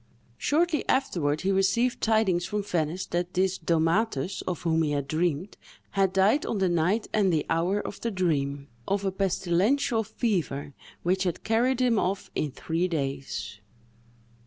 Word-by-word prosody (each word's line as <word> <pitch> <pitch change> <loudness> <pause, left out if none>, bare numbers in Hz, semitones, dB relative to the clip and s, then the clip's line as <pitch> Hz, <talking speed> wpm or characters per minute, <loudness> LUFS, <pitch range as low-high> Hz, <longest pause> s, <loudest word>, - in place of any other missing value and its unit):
Shortly 320 +1 +1
afterward 155 - +1
he 195 - +1
received 195 +6 +2
tidings 215 -6 +2
from 210 -1 -2
Venice 175 -1 -1
that 175 +1 -3
this 190 +1 +1
Domatus, 165 +1 +1
of 180 -2 -3
whom 165 -1 +2
he 150 -2 0
had 140 -1 -2
dreamed, 165 +3 -1 0.3
had 195 -1 +2
died 195 +9 +3
on 225 - -2
the 190 -2 +2
night 175 +6 +1
and 210 -3 +3
at - - +3
the 155 - +1
hour 175 +5 +1
of 205 - -6
the 235 - -1
dream, 145 -8 -1 0.2
of 200 0 0
a 195 - +1
pestilential 200 +6 +1
fever, 180 - -2 0.3
which 185 +2 +1
had 180 -3 -1
carried 240 +3 +2
him 240 -4 +3
off 190 +2 -2
in 150 - -1
three 165 +6 -2
days. 135 - -4
185 Hz, 160 wpm, -27 LUFS, 160-210 Hz, 0.3 s, died